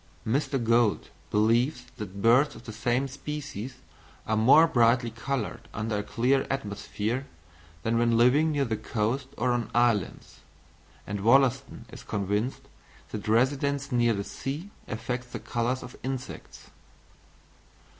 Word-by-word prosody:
Mr. 135 Hz, +4 st, 0 dB
Gould 115 Hz, -2 st, +2 dB, 0.2 s
believes 120 Hz, +5 st, +2 dB
that 100 Hz, -2 st, -7 dB
birds 130 Hz, +5 st, +5 dB
of -, -, -12 dB
the 110 Hz, -, -6 dB
same 120 Hz, +4 st, 0 dB
species 135 Hz, -4 st, -6 dB, 0.5 s
are 110 Hz, -, 0 dB
more 130 Hz, +9 st, +7 dB
brightly 120 Hz, -4 st, +3 dB
coloured 120 Hz, +1 st, -4 dB
under 110 Hz, -1 st, -1 dB
a -, -, -3 dB
clear 130 Hz, +5 st, +1 dB
atmosphere, 110 Hz, +1 st, -3 dB, 0.6 s
than 115 Hz, +1 st, +1 dB
when 115 Hz, -1 st, +3 dB
living 140 Hz, +7 st, +4 dB
near 145 Hz, -2 st, +1 dB
the 115 Hz, -3 st, -1 dB
coast 120 Hz, +6 st, -2 dB
or 125 Hz, -, +1 dB
on 120 Hz, -1 st, -1 dB
islands; 120 Hz, -6 st, +1 dB, 0.7 s
and 100 Hz, 0 st, -4 dB
Wollaston 135 Hz, +1 st, +3 dB
is -, -, -9 dB
convinced 105 Hz, +4 st, -2 dB, 0.5 s
that 105 Hz, -1 st, -5 dB
residence 140 Hz, +4 st, +1 dB
near 120 Hz, -2 st, +3 dB
the 100 Hz, -, -2 dB
sea 145 Hz, -, -5 dB, 0.2 s
affects 120 Hz, +2 st, -4 dB
the -, -, -6 dB
colours 120 Hz, +2 st, -2 dB
of -, -, -10 dB
insects. 130 Hz, -1 st, -7 dB
120 Hz, 135 wpm, -27 LUFS, 110-135 Hz, 0.7 s, more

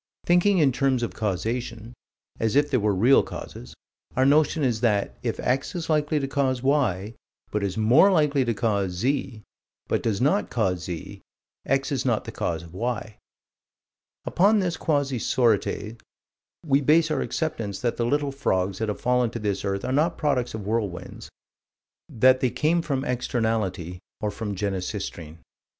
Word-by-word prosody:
Thinking 180 Hz, +3 st, +4 dB
in 145 Hz, -5 st, +4 dB
terms 130 Hz, -1 st, +1 dB
of 120 Hz, -, -3 dB
causation 115 Hz, +3 st, -3 dB, 0.5 s
as 110 Hz, +1 st, 0 dB
if 145 Hz, +1 st, +3 dB
there 130 Hz, -, +3 dB
were 105 Hz, -2 st, +1 dB
real 120 Hz, +8 st, +5 dB
causes 60 Hz, -, -9 dB, 0.4 s
our 130 Hz, -, +3 dB
notion 150 Hz, +2 st, +3 dB
is 120 Hz, -4 st, 0 dB
that, 105 Hz, -4 st, +1 dB
if -, -, -3 dB
X 135 Hz, +7 st, -1 dB
is 165 Hz, -2 st, -3 dB
likely 150 Hz, 0 st, +1 dB
to 135 Hz, -, -2 dB
cause 135 Hz, -2 st, 0 dB
Y, 115 Hz, -8 st, +1 dB, 0.4 s
but 105 Hz, -, -1 dB
is 100 Hz, -1 st, -2 dB
more 125 Hz, -, +5 dB
likely 150 Hz, -6 st, +3 dB
to 115 Hz, -2 st, -1 dB
cause 100 Hz, -4 st, 0 dB
Z, 120 Hz, +2 st, -2 dB, 0.4 s
but -, -, 0 dB
does 105 Hz, -4 st, -1 dB
not 185 Hz, +11 st, +1 dB
cause 95 Hz, -7 st, -1 dB
Z, 85 Hz, -3 st, -7 dB, 0.5 s
X 135 Hz, +1 st, +1 dB
is 130 Hz, -3 st, -1 dB
not 120 Hz, -4 st, 0 dB
the -, -, -6 dB
cause 80 Hz, -1 st, -3 dB
of 85 Hz, 0 st, -13 dB
Y. 110 Hz, 0 st, -3 dB, 1.1 s
Upon 205 Hz, +5 st, +3 dB
this 180 Hz, -4 st, 0 dB
quasi 140 Hz, -6 st, 0 dB
sorites, 115 Hz, -1 st, 0 dB, 0.6 s
we 140 Hz, -2 st, +3 dB
base 155 Hz, +3 st, +3 dB
our -, -, 0 dB
acceptance 110 Hz, -, -3 dB
that 120 Hz, -2 st, -1 dB
the 120 Hz, -, 0 dB
little 145 Hz, +2 st, 0 dB
frogs 95 Hz, -8 st, -1 dB
that 110 Hz, -, -1 dB
have 105 Hz, -, -3 dB
fallen 125 Hz, -1 st, +2 dB
to 120 Hz, -, -6 dB
this 105 Hz, -3 st, -2 dB
earth 100 Hz, 0 st, -2 dB
are 130 Hz, -, -1 dB
not 160 Hz, +5 st, +1 dB
products 130 Hz, -7 st, 0 dB
of 105 Hz, -3 st, -6 dB
whirlwinds: 105 Hz, -5 st, -3 dB, 0.8 s
that 130 Hz, +3 st, +4 dB
they 130 Hz, -1 st, +1 dB
came 160 Hz, +7 st, +1 dB
from 140 Hz, -4 st, -2 dB
externality, 110 Hz, -, -2 dB, 0.2 s
or 105 Hz, -, -2 dB
from 105 Hz, 0 st, -5 dB
Genesistrine. 95 Hz, -4 st, -4 dB
120 Hz, 165 wpm, -25 LUFS, 105-140 Hz, 1.1 s, real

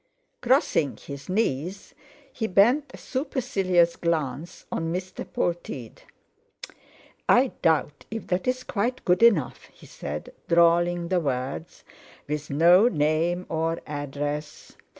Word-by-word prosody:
Crossing 245 Hz, -, +2 dB
his 140 Hz, +2 st, -9 dB
knees, 185 Hz, -2 st, -2 dB, 0.4 s
he 220 Hz, -, -2 dB
bent 240 Hz, +10 st, +4 dB
a -, -, -10 dB
supercilious 195 Hz, -, 0 dB
glance 160 Hz, -1 st, -3 dB
on 165 Hz, 0 st, -2 dB
Mr. 185 Hz, +1 st, -4 dB
Polteed. 170 Hz, -9 st, -4 dB, 1.3 s
"I 250 Hz, +1 st, +5 dB
doubt 150 Hz, -3 st, +1 dB
if 225 Hz, +1 st, -5 dB
that's 255 Hz, +8 st, -1 dB
quite 240 Hz, +4 st, -2 dB
good 180 Hz, +3 st, +3 dB
enough," 205 Hz, -, +3 dB
he -, -, -18 dB
said, 75 Hz, +1 st, -7 dB
drawling 170 Hz, 0 st, +3 dB
the 185 Hz, -1 st, +2 dB
words, 140 Hz, +1 st, -4 dB, 0.4 s
"with 150 Hz, 0 st, -4 dB
no 170 Hz, +9 st, +6 dB
name 165 Hz, 0 st, +1 dB
or 165 Hz, +1 st, -1 dB
address. 145 Hz, +1 st, -5 dB
170 Hz, 110 wpm, -25 LUFS, 150-200 Hz, 1.3 s, no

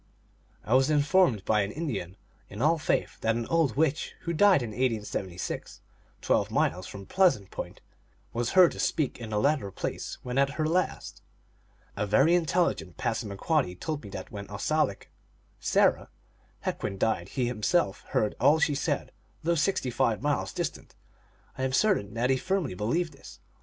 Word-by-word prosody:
I 115 Hz, -, 0 dB
was 130 Hz, +2 st, +4 dB
informed 150 Hz, -, +3 dB
by 105 Hz, -1 st, +3 dB
an 100 Hz, 0 st, -2 dB
Indian 105 Hz, -, -4 dB, 0.3 s
in 100 Hz, -, -9 dB
all 155 Hz, +5 st, +3 dB
faith -, -, -1 dB
that 115 Hz, 0 st, +1 dB
an 115 Hz, 0 st, -2 dB
old 160 Hz, -9 st, +2 dB
witch 155 Hz, -1 st, 0 dB
who 170 Hz, -, -3 dB
died 185 Hz, -4 st, +5 dB
in 115 Hz, -, -5 dB
1876, 105 Hz, -7 st, -3 dB, 0.4 s
twelve -, -, +1 dB
miles 90 Hz, +1 st, 0 dB
from 100 Hz, -1 st, -9 dB
Pleasant 175 Hz, -, +2 dB
Point, -, -, -7 dB, 0.5 s
was 120 Hz, 0 st, -1 dB
heard 185 Hz, -2 st, +7 dB
to -, -, -9 dB
speak 150 Hz, -6 st, 0 dB
in 115 Hz, -2 st, -7 dB
the 105 Hz, -1 st, 0 dB
latter 140 Hz, -4 st, +1 dB
place -, -, -5 dB
when 125 Hz, +2 st, -1 dB
at 140 Hz, 0 st, +2 dB
her 155 Hz, -, 0 dB
last. 180 Hz, +3 st, -1 dB, 0.7 s
A 105 Hz, +1 st, -1 dB
very 135 Hz, -, +4 dB
intelligent 170 Hz, -, +1 dB
Passamaquoddy 110 Hz, -, -1 dB
told 150 Hz, -, -4 dB
me 100 Hz, -, -10 dB
that 95 Hz, -1 st, -8 dB
when 100 Hz, -1 st, -7 dB
Osalik 105 Hz, +2 st, -1 dB, 0.5 s
(Sarah) -, -, +2 dB, 0.5 s
Hequin 95 Hz, -, -3 dB
died 95 Hz, -3 st, 0 dB
he 130 Hz, -, -1 dB
himself 120 Hz, -, 0 dB
heard 105 Hz, -, 0 dB
all 145 Hz, +4 st, +5 dB
she 160 Hz, -2 st, +2 dB
said, 140 Hz, -, -2 dB, 0.3 s
though 170 Hz, +2 st, +2 dB
sixty 155 Hz, -5 st, 0 dB
five 115 Hz, -4 st, +1 dB
miles 145 Hz, +1 st, -1 dB
distant. -, -, -5 dB, 0.6 s
I -, -, -1 dB
am 130 Hz, 0 st, -1 dB
certain 135 Hz, -, +2 dB
that 125 Hz, +3 st, +1 dB
he 130 Hz, -, +3 dB
firmly 185 Hz, -, -1 dB
believed 145 Hz, -, -1 dB
this. 135 Hz, -, -13 dB
130 Hz, 165 wpm, -28 LUFS, 105-160 Hz, 0.7 s, heard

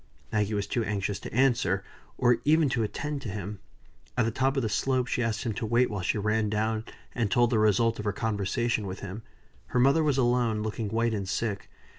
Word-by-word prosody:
Maggie 105 Hz, -1 st, 0 dB
was 100 Hz, -1 st, -1 dB
too 115 Hz, +3 st, -1 dB
anxious 100 Hz, -2 st, -2 dB
to -, -, -8 dB
answer, 120 Hz, -7 st, +2 dB, 0.3 s
or 120 Hz, -1 st, +3 dB
even 155 Hz, 0 st, +4 dB
to 125 Hz, -2 st, 0 dB
attend 145 Hz, +6 st, -3 dB
to 120 Hz, -, -5 dB
him. 100 Hz, 0 st, -5 dB, 0.6 s
At 120 Hz, -, +3 dB
the 115 Hz, -, 0 dB
top 135 Hz, +4 st, +1 dB
of 135 Hz, -, +1 dB
the -, -, +1 dB
slope 130 Hz, +4 st, +1 dB
she 125 Hz, -, -1 dB
asked 115 Hz, -2 st, -1 dB
him 115 Hz, -3 st, -1 dB
to 110 Hz, -, -3 dB
wait 120 Hz, +2 st, +3 dB
while 105 Hz, -2 st, -3 dB
she 85 Hz, -, 0 dB
ran 105 Hz, +1 st, +1 dB
down 110 Hz, +1 st, -1 dB, 0.3 s
and 115 Hz, -4 st, 0 dB
told 120 Hz, +4 st, +3 dB
the 110 Hz, -, +3 dB
result 110 Hz, +2 st, +3 dB
of 105 Hz, -, -4 dB
her 105 Hz, -, +1 dB
conversation 110 Hz, +1 st, -1 dB
with 95 Hz, +1 st, -6 dB
him. 100 Hz, +3 st, -6 dB, 0.5 s
Her 125 Hz, -, 0 dB
mother 140 Hz, +5 st, +5 dB
was 145 Hz, -3 st, +2 dB
alone, 120 Hz, -4 st, +2 dB
looking 110 Hz, 0 st, -3 dB
white 115 Hz, +1 st, +1 dB
and 100 Hz, -3 st, -3 dB
sick. 105 Hz, -1 st, -2 dB
110 Hz, 220 wpm, -28 LUFS, 105-125 Hz, 0.6 s, mother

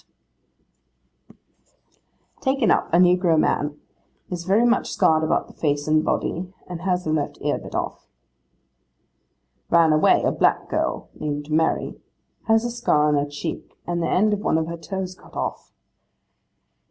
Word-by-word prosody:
'Taken 265 Hz, -6 st, +2 dB
up, -, -, +1 dB
a 170 Hz, -, +4 dB
negro 180 Hz, -2 st, +4 dB
man. 145 Hz, 0 st, 0 dB, 0.5 s
Is 175 Hz, -1 st, -4 dB
very 205 Hz, +5 st, +3 dB
much 240 Hz, +1 st, +1 dB
scarred 160 Hz, 0 st, +3 dB
about 155 Hz, -, +1 dB
the -, -, -16 dB
face 145 Hz, -1 st, -1 dB
and 155 Hz, 0 st, +3 dB
body, 180 Hz, +3 st, -2 dB
and 175 Hz, -2 st, -7 dB
has 180 Hz, -1 st, 0 dB
the 155 Hz, -, -1 dB
left 150 Hz, -2 st, -2 dB
ear -, -, 0 dB
bit -, -, -9 dB
off.' -, -, -4 dB, 1.6 s
'Ran 165 Hz, -2 st, +5 dB
away, 155 Hz, -, +4 dB
a -, -, +2 dB
black -, -, +1 dB
girl, -, -, -2 dB
named 145 Hz, 0 st, -5 dB
Mary. 160 Hz, +1 st, 0 dB, 0.5 s
Has 225 Hz, +1 st, +3 dB
a 240 Hz, -, -2 dB
scar 150 Hz, -11 st, +2 dB
on -, -, +2 dB
her 145 Hz, 0 st, 0 dB
cheek, 145 Hz, +3 st, -6 dB
and 175 Hz, 0 st, -2 dB
the -, -, -1 dB
end 210 Hz, +3 st, +3 dB
of 205 Hz, -, -1 dB
one 180 Hz, -, +1 dB
of 160 Hz, -, 0 dB
her 170 Hz, +1 st, -5 dB
toes 190 Hz, +1 st, -5 dB
cut 185 Hz, -, -19 dB
off. -, -, -4 dB
170 Hz, 155 wpm, -23 LUFS, 155-190 Hz, 1.6 s, Ran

